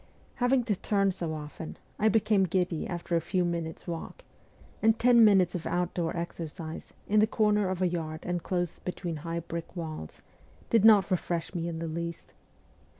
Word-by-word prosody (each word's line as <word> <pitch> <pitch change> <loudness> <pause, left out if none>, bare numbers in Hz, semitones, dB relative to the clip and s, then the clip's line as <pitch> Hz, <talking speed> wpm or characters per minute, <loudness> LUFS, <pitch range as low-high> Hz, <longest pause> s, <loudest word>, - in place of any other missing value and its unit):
Having 245 0 +3
to 220 -3 0
turn 195 +1 +1
so 170 -3 -4
often, 155 +1 -7 0.2
I 220 - +4
became 210 -2 +3
giddy 180 -2 -1
after 175 -1 -3
a 165 - +2
few 180 +2 0
minutes' 170 -2 -3
walk, 170 - -6 0.6
and 225 0 +4
ten 240 -1 +6
minutes 190 -5 +5
of 175 - -4
outdoor 175 -1 -1
exercise, 165 -1 -6
in 215 +1 +4
the 215 - +5
corner 210 -3 +2
of 185 0 -1
a - - +4
yard 160 -2 -3
inclosed 175 0 -2
between 175 -2 -4
high 165 +2 -4
brick 170 +1 -6
walls, 155 - -6 0.5
did 225 -3 +4
not 210 -3 +7
refresh 175 -1 -1
me 170 -2 -2
in 165 -1 -4
the 165 0 -3
least. 170 +1 -5
175 Hz, 170 wpm, -29 LUFS, 165-200 Hz, 0.6 s, not